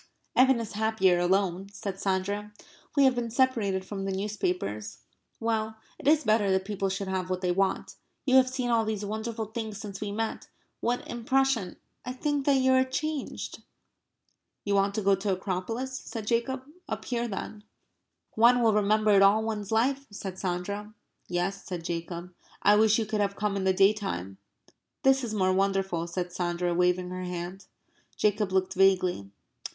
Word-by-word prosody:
"Evan 260 -1 +5
is 225 -2 -5
happier 210 -4 +2
alone," 190 +1 +1
said 200 -1 -5
Sandra. 200 +2 -1 0.5
"We 280 - +6
have 265 -1 +5
been 240 -1 -2
separated 225 -7 +1
from 195 0 -5
the 195 - -2
newspapers. 180 - -2 0.4
Well, 220 -1 -1 0.2
it - - -6
is 310 +1 +5
better 215 -3 +3
that 190 0 +1
people 195 -1 -1
should 195 +1 -3
have 185 -1 -2
what 185 0 -2
they 180 -1 +1
want.... 195 +1 0 0.3
You 260 -1 +5
have 255 -1 +5
seen 255 -2 -2
all 230 -1 +3
these 215 -2 -2
wonderful 220 +2 -3
things 220 -1 -5
since 200 -2 -7
we 205 -1 -3
met.... 225 +2 -3 0.3
What 245 +1 -1
impression... 240 -4 0 0.3
I 250 - -4
think 290 +1 -1
that 280 - +5
you 260 0 +3
are 260 0 +5
changed." 295 +2 -4 1.0
"You 200 - 0
want 200 0 +2
to 215 - -1
go 200 +1 +4
to 195 +2 -2
the 195 - +3
Acropolis," 225 +8 -3
said 225 -3 -7
Jacob. 245 +3 0 0.3
"Up - - -4
here 240 -1 -1
then." 210 0 -6 0.7
"One 240 +2 +5
will 225 -2 +4
remember 210 +1 +3
it 200 -1 +6
all 200 +3 +5
one's 215 -2 -3
life," 265 +5 +1
said 190 -2 -7
Sandra. 200 +4 -3 0.3
"Yes," 180 +3 -2
said 175 -3 -6
Jacob. 170 +1 -5 0.3
"I 205 - +6
wish 215 0 +5
you 225 - 0
could 215 0 -1
have 200 -1 0
come 210 -1 -1
in 195 -1 -1
the 190 - +4
day 195 +2 +5
time." 95 - -5 0.6
"This 270 0 +4
is 220 -3 -3
more 185 -2 +2
wonderful," 195 -3 0
said 175 0 -4
Sandra, 175 0 -1
waving 180 +1 +1
her 185 0 -4
hand. 180 +1 -6 0.5
Jacob 210 -1 +1
looked 190 0 +1
vaguely. 185 - +2
205 Hz, 175 wpm, -28 LUFS, 190-225 Hz, 1.0 s, We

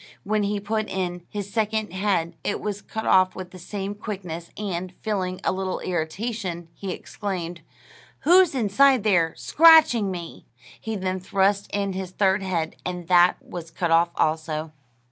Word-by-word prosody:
When 210 +1 0
he 205 0 0
put 215 +2 -2
in 180 -2 -3
his 200 -1 -6
second 215 -3 -1
head 185 -4 0
it - - -1
was 205 -1 -4
cut 220 - -6
off 185 0 +4
with 185 -1 -7
the 185 - -11
same 200 +2 -5
quickness; 185 -5 -6
and, 185 -3 -4
feeling 185 -4 -2
a - - +2
little 190 0 -2
irritation, 180 +1 -3
he 195 - -7
exclaimed, 180 -4 -5 0.6
"Who's 355 -1 +5
inside 255 +2 +4
there, 175 -6 +2
scratching 315 -10 +6
me?" 175 -3 -7 0.3
He 220 0 -4
then 185 -1 -2
thrust 195 +2 +1
in 200 -1 -1
his 190 -1 -4
third 190 +1 +2
head, 170 -4 -2
and 180 -2 -5
that 180 0 +5
was 170 -2 -7
cut 170 0 -2
off 170 +1 +5
also. 155 0 -1
190 Hz, 160 wpm, -24 LUFS, 175-210 Hz, 0.6 s, scratching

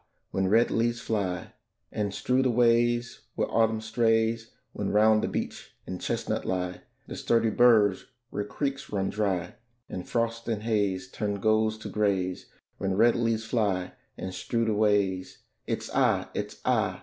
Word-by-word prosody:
when 95 0 0
red 115 +5 +4
leaves 120 +1 +1
fly, 100 -6 -2 0.4
And 105 -2 -2
strew 125 +6 +1
the 130 - +2
ways 120 0 +2 0.2
where - - 0
Autumn 110 -1 +2
strays; 115 0 +1 0.2
When - - -2
round 110 +1 +4
the - - 0
beech - - -5
and 90 - -6
chestnut - - -2
lie 90 -1 -2 0.2
The - - -7
sturdy 115 -1 +2
burrs 105 -5 +4 0.2
where 105 - -2
creeks 140 +6 -4
run 95 -2 -1
dry, 95 -5 -1 0.3
And 90 - -7
frosts 115 0 -1
and 110 -2 -2
haze 100 -5 0
turn 105 +1 -3
golds 110 +1 +2
to 110 - -8
grays: 95 -3 0 0.3
When 95 0 -1
red 120 +2 +5
leaves 115 -2 0
fly 100 -6 0 0.2
and 95 0 -5
strew 115 +5 -1
the 110 - +1
ways, 100 -3 +1 0.2
It's - - -3
ay, - - +2
it's - - -5
ay! - - +1
110 Hz, 160 wpm, -28 LUFS, 95-115 Hz, 0.4 s, red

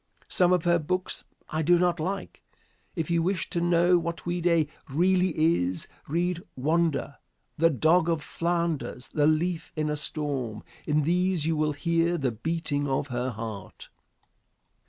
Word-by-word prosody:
Some 180 -3 +4
of 180 -3 +3
her 170 -1 +3
books 185 +4 -2 0.3
I 155 - 0
do 175 +3 +4
not 175 -1 +1
like. 195 +5 -4 0.5
If 165 -2 -2
you 170 -1 +3
wish 185 +1 -1
to 170 - 0
know 175 +1 +4
what 170 0 -5
Ouida 175 -2 +2 0.2
really 180 +4 +2
is, 95 - +1 0.2
read 175 +3 -1
"Wanda," 150 0 0 0.4
"The 165 +1 +5
Dog 160 +4 +3
of 165 -3 0
Flanders," 170 -6 -2
"The 150 -1 +2
Leaf 165 +2 0
in 155 -1 -1
a - - 0
Storm." 140 -7 -2 0.2
In 150 -1 +2
these 180 0 +1
you 165 0 +1
will 150 0 +1
hear 170 +3 +1
the 135 -5 0
beating 145 +3 -2
of 135 +1 -1
her 125 +1 -2
heart. 110 -3 -7
165 Hz, 155 wpm, -27 LUFS, 145-175 Hz, 0.5 s, The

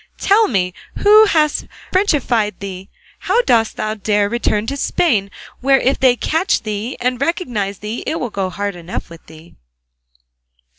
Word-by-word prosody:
Tell 425 +2 +3
me, 180 -4 0 0.3
who 425 +1 +8
has 310 -7 +1 0.3
frenchified 260 - +1
thee, 195 -1 -7
and - - -19
how 425 +6 +4
dost 225 - +2
thou 215 0 -2
dare 205 -1 0
to - - -14
return 220 -3 0
to 275 - -3
Spain, 230 - +1 0.3
where 270 +1 +4
if 265 - +1
they 255 -2 +4
catch 330 - 0
thee 215 +3 -4
and 250 +1 -1
recognise 240 - -2
thee 210 +4 -5
it 320 - -1
will 245 - -4
go 195 -2 -2
hard 200 +1 -4
enough 175 0 -7
with 165 - -12
thee?" 160 +1 -15
230 Hz, 165 wpm, -18 LUFS, 200-300 Hz, 0.3 s, who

